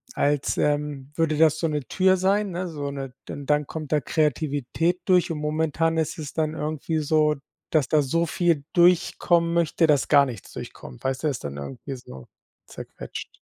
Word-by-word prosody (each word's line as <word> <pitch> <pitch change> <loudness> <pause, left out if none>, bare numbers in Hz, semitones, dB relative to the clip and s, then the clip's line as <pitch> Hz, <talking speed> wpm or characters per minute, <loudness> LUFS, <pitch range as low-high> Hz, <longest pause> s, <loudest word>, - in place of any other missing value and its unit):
als, 145 -1 +1
ähm, 145 -2 -1
würde 160 -2 +1
das 160 0 +4
so 165 - +1
'ne 150 -2 -2
Tür 190 0 +3
sein, 195 +2 +1
ne, 180 +1 -3
so 145 -4 -4
'ne 135 -2 -6 0.2
d 145 - -6
dann 150 0 +1
kommt 155 -3 -6
da 150 -1 +3
Kreativität 155 +3 0
durch 180 -2 +3
und 160 - -3
momentan 160 +2 0
ist 160 0 -1
es 150 -3 -6
dann 155 -1 -1
irgendwie 155 +1 -2
so, 150 0 +2 0.3
dass 150 -5 +2
da 155 +2 +3
so 165 +5 +1
viel 170 -4 +1
durchkommen 170 -1 +3
möchte, 170 0 +2
dass 150 -3 +3
gar 140 -2 +6
nichts 120 -8 -8
durchkommt, 65 - -9
weißt 130 +1 -2
du? - - +2
Ist 135 -6 -3
dann 70 0 -5
irgendwie 130 - -6
so 65 - -11 0.4
zerquetscht. - - -9
155 Hz, 180 wpm, -25 LUFS, 140-165 Hz, 0.4 s, gar